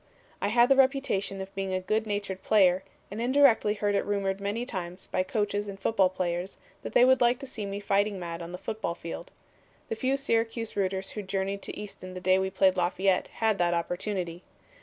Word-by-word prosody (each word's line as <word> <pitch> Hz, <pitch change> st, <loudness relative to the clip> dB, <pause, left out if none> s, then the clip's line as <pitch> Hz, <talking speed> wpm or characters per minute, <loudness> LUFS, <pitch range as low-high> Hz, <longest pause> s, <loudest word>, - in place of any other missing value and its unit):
"I -, -, +1 dB
had 235 Hz, +3 st, +5 dB
the 270 Hz, -, +5 dB
reputation 260 Hz, -8 st, +1 dB
of 190 Hz, 0 st, -8 dB
being 195 Hz, -1 st, -3 dB
a -, -, +1 dB
good 215 Hz, +4 st, -1 dB
natured 205 Hz, -2 st, -3 dB
player, 190 Hz, -3 st, +4 dB, 0.3 s
and 210 Hz, +3 st, -4 dB
indirectly 245 Hz, -4 st, +4 dB
heard 205 Hz, 0 st, 0 dB
it 200 Hz, -, +2 dB
rumored 200 Hz, -1 st, -1 dB
many 205 Hz, +4 st, -2 dB
times 185 Hz, -5 st, -5 dB
by -, -, -1 dB
coaches 205 Hz, +1 st, -1 dB
and 195 Hz, -1 st, -7 dB
football 195 Hz, -3 st, +3 dB
players 180 Hz, 0 st, -3 dB, 0.2 s
that -, -, -7 dB
they 245 Hz, -, +7 dB
would 260 Hz, 0 st, +4 dB
like 240 Hz, +1 st, +4 dB
to 275 Hz, -, -8 dB
see 220 Hz, -6 st, -5 dB
me 200 Hz, 0 st, -4 dB
fighting 200 Hz, 0 st, +1 dB
mad 170 Hz, -1 st, -5 dB
on 170 Hz, 0 st, -7 dB
the 180 Hz, -, -5 dB
football 190 Hz, -3 st, -4 dB
field. 170 Hz, -, -7 dB, 0.6 s
The -, -, -1 dB
few 260 Hz, +4 st, 0 dB
Syracuse 230 Hz, -3 st, -1 dB
rooters 190 Hz, -1 st, -1 dB
who 210 Hz, -, -5 dB
journeyed 195 Hz, 0 st, -2 dB
to -, -, -6 dB
Easton 185 Hz, -3 st, -8 dB
the -, -, -4 dB
day 185 Hz, +1 st, +3 dB
we 190 Hz, 0 st, 0 dB
played 190 Hz, -1 st, +3 dB
Lafayette 185 Hz, +1 st, +1 dB
had 220 Hz, -3 st, 0 dB
that 175 Hz, 0 st, +2 dB
opportunity. 175 Hz, 0 st, -3 dB
200 Hz, 205 wpm, -28 LUFS, 185-220 Hz, 0.6 s, they